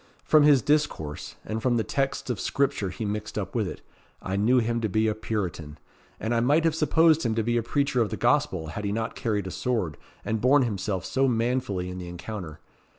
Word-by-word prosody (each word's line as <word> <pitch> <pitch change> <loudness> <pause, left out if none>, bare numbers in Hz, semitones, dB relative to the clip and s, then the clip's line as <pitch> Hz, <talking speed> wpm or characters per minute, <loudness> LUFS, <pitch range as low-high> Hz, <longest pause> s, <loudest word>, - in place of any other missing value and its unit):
From 155 - +5
his 145 -5 +5
discourse, 145 - -1
and 110 +1 -3
from 120 -1 +2
the 110 - +1
texts 135 0 -1
of 110 - -3
Scripture 140 -8 0
he 100 +5 -5
mixed 105 +1 -4
up - - -3
with - - 0
it, - - -7 0.4
I 95 - -3
knew 110 +6 +3
him 115 -1 +1
to 110 - 0
be 110 +3 +2
a 110 - +1
Puritan; 90 -8 -4 0.4
and 110 +2 -1
I 115 - +2
might 145 +7 +3
have 165 -1 +2
supposed 160 0 +4
him 115 -2 0
to 115 - +1
be 120 +2 0
a 120 - +2
preacher 130 +2 0
of 110 - +1
the - - -4
Gospel, 120 - +1
had 105 +7 -5
he 100 - -1
not 115 +2 -2
carried 105 -4 -1
a 95 - -5
sword, 110 -12 -2 0.3
and 110 -1 -1
borne 135 +2 +5
himself 95 -4 -2
so 135 0 +1
manfully 115 -6 0
in 90 0 -6
the 90 - -7
encounter. 90 -3 -7
115 Hz, 220 wpm, -26 LUFS, 100-130 Hz, 0.4 s, From